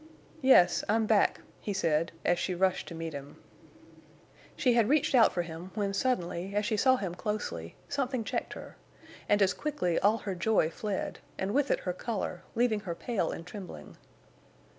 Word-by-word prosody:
"Yes, 220 -10 +6
I'm 220 +1 +3
back," 215 -1 +3 0.2
he 205 - -3
said, 165 -3 +1
as 175 0 +3
she 185 - -1
rushed 185 +1 +1
to 170 - -7
meet 165 -1 -5
him. 140 0 -8 1.2
She 250 -3 +3
had 230 -2 +3
reached 295 -1 +3
out 240 -4 +6
for 175 - -1
him 170 +2 -8
when 200 -2 -1
suddenly, 195 -4 -1
as 210 0 +1
she 220 0 +1
saw 260 +5 +4
him 195 -8 -3
closely, 180 - -4
something 265 -4 -1
checked - - -3
her, - - -10 0.5
and 205 0 +5
as 195 - +3
quickly 285 - -1
all 210 +3 +3
her 200 -3 -4
joy 180 -3 +2
fled, 205 0 -3 0.2
and 190 +2 -2
with 285 +1 +2
it - - +1
her 180 - -2
color, 195 -2 -4
leaving 230 -2 +2
her 180 -5 -5
pale 200 -3 -1
and 165 - -7
trembling. 180 - -9
200 Hz, 180 wpm, -30 LUFS, 175-225 Hz, 1.2 s, Yes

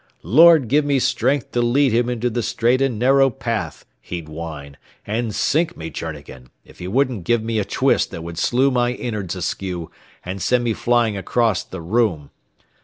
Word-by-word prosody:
'Lord 155 - +6
give 145 +5 +3
me 145 -1 +1
strength 130 +1 0
to 120 - 0
lead 130 +3 +2
him 120 +1 +2
into 120 0 -1
the 120 +2 -1
straight 120 +3 +1
and 135 -5 0
narrow 135 +3 +4
path,' 120 -3 -4 0.2
he'd 85 -3 -7
whine; 75 -3 -8 0.3
and 110 0 -2
sink 160 +3 0
me, 80 0 -7
Journegan, 70 -6 -8 0.2
if - - -18
he 90 - -6
wouldn't 125 -1 0
give 115 +4 +1
me 110 -1 -1
a 100 - -1
twist - - +1
that 85 - -8
would 85 0 -6
slew 130 +8 +2
my 125 -1 +1
innerds 105 -8 -4
askew 90 -1 -4 0.3
and 95 +2 -5
send 125 +7 +1
me 115 -2 0
flying 120 -2 +1
acrost 115 +2 0
the 95 - -7
room. 90 -5 0
115 Hz, 180 wpm, -20 LUFS, 90-125 Hz, 0.3 s, Lord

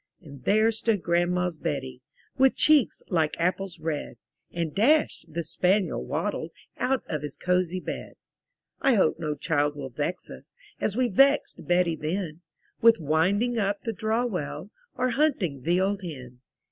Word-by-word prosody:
And 140 -4 -13
there 215 +2 +4
stood 220 -3 0
Grandma's 175 -1 +1
Betty, 130 -4 -4 0.3
With 265 0 +4
cheeks 300 -6 +3
like 160 -4 +1
apples 180 +1 -1
red; 155 -2 -4 0.3
And 165 -3 -3
Dash, 295 +10 +3
the 165 +1 -4
spaniel, 185 +5 +1
waddled - - -2 0.3
Out 265 0 +1
of 155 -3 -3
his 145 -2 -6
cosy 180 0 0
bed. - - -6 0.7
I 265 -3 +4
hope 185 -6 +2
no 150 -2 -2
child 145 0 0
will 140 -2 -6
vex 150 +8 -3
us, - - -12 0.2
As 205 - -1
we 255 0 +2
vexed 275 +7 +2
Betty 175 -1 +2
then, 160 +1 -4 0.4
With 230 0 +6
winding 190 - +1
up 200 0 -1
the 225 - -2
draw 220 +3 0
well, 185 -1 -4 0.2
Or 255 0 +1
hunting 225 - 0
the 175 +6 +1
old 200 +1 0
hen. 130 -8 -8
180 Hz, 155 wpm, -26 LUFS, 155-220 Hz, 0.7 s, With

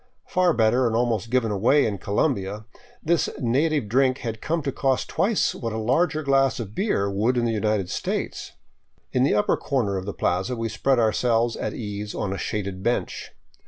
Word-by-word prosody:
Far 180 -1 +2
better, 120 +3 +3
and 115 - -1
almost 115 -2 0
given 120 -3 +1
away 120 +9 +3
in 100 -3 -2
Colombia, 105 - -1 0.4
this 170 0 +1
native 140 +1 +1
drink 130 +3 +2
had 110 -1 -4
come 165 0 -1
to 135 - -1
cost 135 -1 0
twice 210 +1 +1
what 115 -2 -4
a - - -3
larger 150 +8 +1
glass 135 -2 +2
of 105 -3 -6
beer 190 - 0
would 105 +6 +1
in 120 - +1
the 115 - +1
United 105 -3 0
States. - - -3 0.6
In 125 - +1
the 130 - +3
upper 105 - +2
corner 115 -9 -1
of 95 +1 -5
the 100 - -3
plaza 95 +8 -1
we 115 -1 -3
spread 130 +5 +1
ourselves 115 +1 +2
at - - -4
ease 105 -2 -5
on 95 -2 -2
a 95 - -5
shaded 100 -3 -3
bench. 120 +4 -2
115 Hz, 190 wpm, -24 LUFS, 105-135 Hz, 0.6 s, better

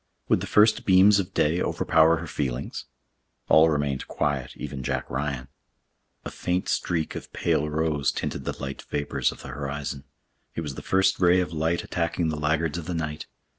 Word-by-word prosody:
Would - - +3
the - - -4
first 110 +1 +4
beams 100 +2 +6
of 95 - -3
day 80 +4 +2
overpower 80 0 +3
her 85 - -6
feelings? 70 -4 -4 0.6
All 80 +1 +7
remained 70 -3 -1
quiet, 70 -3 -2
even 70 - -6
Jack - - -2
Ryan. 65 -2 -3 0.8
A - - -5
faint 90 +1 -2
streak 80 -3 -1
of - - -8
pale 75 +1 0
rose 75 -2 0
tinted 70 - -4
the - - -3
light 70 0 -5
vapors 70 -1 0
of - - -12
the - - -8
horizon. 70 +1 -5 0.5
It - - -2
was 75 -4 -5
the - - -8
first 95 0 +2
ray 90 0 +5
of 90 -2 -2
light 80 +2 0
attacking 85 -1 -1
the 80 - -2
laggards 80 +2 0
of 80 - -8
the 90 - -2
night. 75 -2 -4
80 Hz, 180 wpm, -26 LUFS, 70-85 Hz, 0.8 s, All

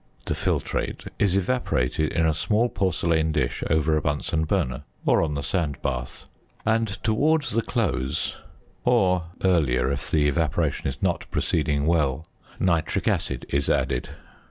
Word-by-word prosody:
The - - -1
filtrate - - -2
is 100 -3 +3
evaporated 85 - 0
in 80 - +1
a 80 - +3
small 110 +9 +1
porcelain 85 -5 +1
dish - - -1
over 80 0 +2
a 75 - +1
Bunsen 75 +2 -1
burner, 65 -2 0 0.2
or - - +4
on 75 -3 -1
the 70 - -3
sand 75 -8 -1
bath; 65 -3 -3 0.4
and 115 0 +2 0.2
towards 145 +7 +2
the 115 - +1
close 85 - -1 0.5
(or 90 -2 +3 0.2
earlier 70 -9 +2
if 70 - -2
the 75 -1 +3
evaporation 75 -1 0
is 70 0 -4
not - - 0
proceeding 75 -2 0
well) 80 -3 +1 0.3
nitric 85 -4 +1
acid - - -1
is 70 0 0
added. - - 0
80 Hz, 145 wpm, -25 LUFS, 70-95 Hz, 0.5 s, or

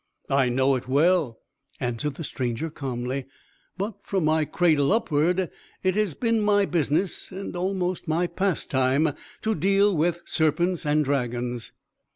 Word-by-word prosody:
"I 135 -2 +3
know 130 +2 +2
it 130 -1 -3
well," 145 -2 +2 0.4
answered 125 +3 -2
the 165 - -6
stranger, 130 +2 -3
calmly. 130 -2 -4 0.5
"But, 200 +2 -3
from 190 -5 -1
my 155 0 +3
cradle 155 -4 +2
upward, 180 -4 +1 0.3
it 185 0 +2
has 205 -6 0
been 230 -2 +1
my 205 -1 +3
business, 165 +1 0
and 190 -1 -6
almost 185 -1 -2
my 165 +3 +1
pastime, 155 -6 +1 0.3
to 220 - +1
deal 195 +3 +3
with 170 +2 0
serpents 170 +1 +1
and 150 0 +3
dragons." 125 -3 -2
160 Hz, 140 wpm, -25 LUFS, 135-185 Hz, 0.5 s, I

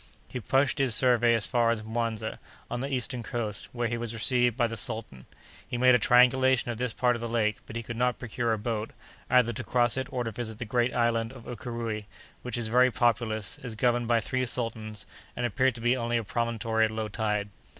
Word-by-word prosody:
He 125 - -4
pushed 135 +5 +1
his 130 -5 +3
survey 120 0 +4
as 110 - +1
far 120 -3 +2
as 115 -2 0
Muanza, 110 -1 -3 0.3
on 120 - -2
the 135 +3 -3
eastern 125 -1 -1
coast, 110 -2 -3
where 120 -1 -1
he 120 0 -2
was 115 -1 -4
received 120 +1 +2
by 120 - +3
the 115 0 -3
sultan. 110 - -5 0.4
He 120 - -3
made 125 +1 +6
a 125 - +5
triangulation 125 0 +4
of 115 - -6
this 125 -2 -1
part 125 +1 +2
of 115 - -6
the 120 - -3
lake, 110 -2 +1
but 110 - -9
he 115 - -3
could 115 0 -6
not 125 0 +1
procure 120 -1 -2
a 110 - +1
boat, 110 0 -3 0.4
either 125 -2 +4
to 125 - -5
cross 120 +2 +2
it 130 0 -3
or 125 -2 -1
to 115 - -3
visit 110 0 -5
the 120 - -5
great 120 +2 0
island 115 -1 +1
of 130 -3 -12
Ukéréoué 115 -2 -5 0.4
which 125 -1 -4
is 120 -2 -2
very 125 +3 +5
populous, 115 -3 0
is 115 -4 -6
governed 120 0 +1
by 120 -1 +3
three 130 +3 -1
sultans, 110 -3 -3 0.3
and 120 - -2
appears 130 +3 +2
to 115 - -9
be 120 +2 +3
only 120 -1 0
a 115 - -1
promontory 115 0 0
at - - -1
low 110 0 -3
tide. 105 -1 -1
120 Hz, 225 wpm, -28 LUFS, 110-125 Hz, 0.4 s, made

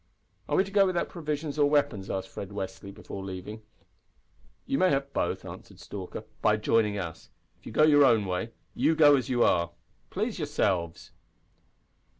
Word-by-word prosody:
"Are - - +1
we 190 - +5
to 195 - -9
go 200 -1 +4
without 180 -2 -1
provisions 150 -2 -4
or 145 -1 +4
weapons?" 145 -10 +1
asked 95 0 -3
Fred 100 - -7
Westly, 100 -1 -6
before 100 0 -8
leaving. 95 +3 -7 1.0
"You 135 - -1
may 185 - +4
have 140 -1 -1
both," - - -1
answered - - -11
Stalker, 95 -3 -7 0.2
"by 105 -1 +3
joining 105 -1 +1
us. 85 -4 -6 0.3
If - - -14
you - - -7
go 150 - +3
your 145 -2 +6
own 115 -5 +4
way 90 +5 -2 0.2
you 160 - +2
go 145 -2 +7
as 130 -1 -2
you 120 -2 +3
are. 85 0 +2 0.4
Please - - -3
yourselves." 85 -4 -1
115 Hz, 170 wpm, -28 LUFS, 95-145 Hz, 1.0 s, go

